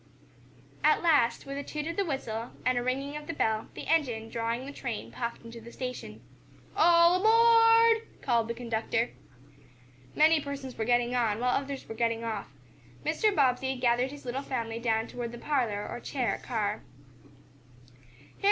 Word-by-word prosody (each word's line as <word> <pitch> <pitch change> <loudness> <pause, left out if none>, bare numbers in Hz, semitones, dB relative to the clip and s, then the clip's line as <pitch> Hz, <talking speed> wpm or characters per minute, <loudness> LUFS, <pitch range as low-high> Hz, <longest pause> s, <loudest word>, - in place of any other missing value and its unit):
At 305 +3 +4
last, 285 -8 +3
with 275 0 -5
a - - -4
toot 300 +1 -5
of 335 +1 -3
the 400 - +1
whistle, 235 - -4
and 255 0 +3
a 245 - +1
ringing 270 +4 -2
of 300 0 -7
the 335 - -3
bell, 220 -3 0
the - - -7
engine, 245 -9 0
drawing 230 +2 -2
the 280 - -7
train, 245 -6 -5
puffed 235 -1 -5
into 230 0 -9
the 235 +1 -11
station. 250 0 -6 0.5
"All 340 +1 +6
aboard!" 455 +1 +5 0.2
called 235 -3 +2
the 235 - -3
conductor. 230 0 -1 1.0
Many 310 0 +5
persons 275 -3 -6
were 220 - -2
getting 240 +1 +2
on, 225 -3 +1
while 250 +1 +1
others 275 -1 -4
were - - -6
getting 230 0 -1
off. 220 -3 -4 0.6
Mr. 390 +7 +2
Bobbsey 265 -2 +2
gathered 250 0 +1
his 285 0 -11
little 250 +2 -3
family 230 -4 -3
down 225 -1 0
toward 240 -1 -6
the - - -7
parlor, 235 -7 -1
or 240 - -6
chair, 245 -5 -2
car. 215 -4 -2
250 Hz, 165 wpm, -29 LUFS, 230-295 Hz, 1.0 s, All